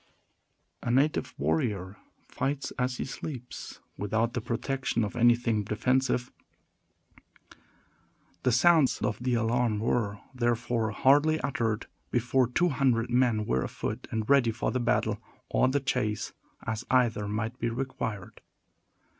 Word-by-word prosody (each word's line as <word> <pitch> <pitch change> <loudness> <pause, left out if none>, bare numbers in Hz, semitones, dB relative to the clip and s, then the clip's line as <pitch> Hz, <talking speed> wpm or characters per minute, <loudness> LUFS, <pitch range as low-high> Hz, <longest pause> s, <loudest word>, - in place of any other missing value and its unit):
A - - -3
native 135 +5 +1
warrior 90 - -1 0.3
fights 140 0 -2
as 125 0 0
he - - -3
sleeps, 130 -2 -7 0.2
without 110 +3 0
the 120 - -2
protection 120 +1 -1
of 105 - -4
anything 120 -2 +3
defensive. 125 +4 0 2.1
The 125 - +2
sounds 155 +2 +5
of 105 - -1
the 125 -1 +1
alarm 115 -1 +1
were, 105 -1 0 0.2
therefore, 120 -2 0
hardly 145 +8 +4
uttered 115 -5 -1 0.2
before 125 +1 +2
two 175 +9 +2
hundred 125 -4 +1
men 120 -4 +2
were 65 -6 +1
afoot, - - -4
and 110 -1 -2
ready 140 -4 +5
for 115 +1 -1
the 130 - 0
battle 115 -3 0 0.3
or - - +3
the 135 +2 +1
chase, 125 -6 -1 0.3
as 110 +1 -2
either 115 -5 +2
might 110 +4 -3
be 115 - 0
required. 115 -5 -4
120 Hz, 130 wpm, -28 LUFS, 110-130 Hz, 2.1 s, sounds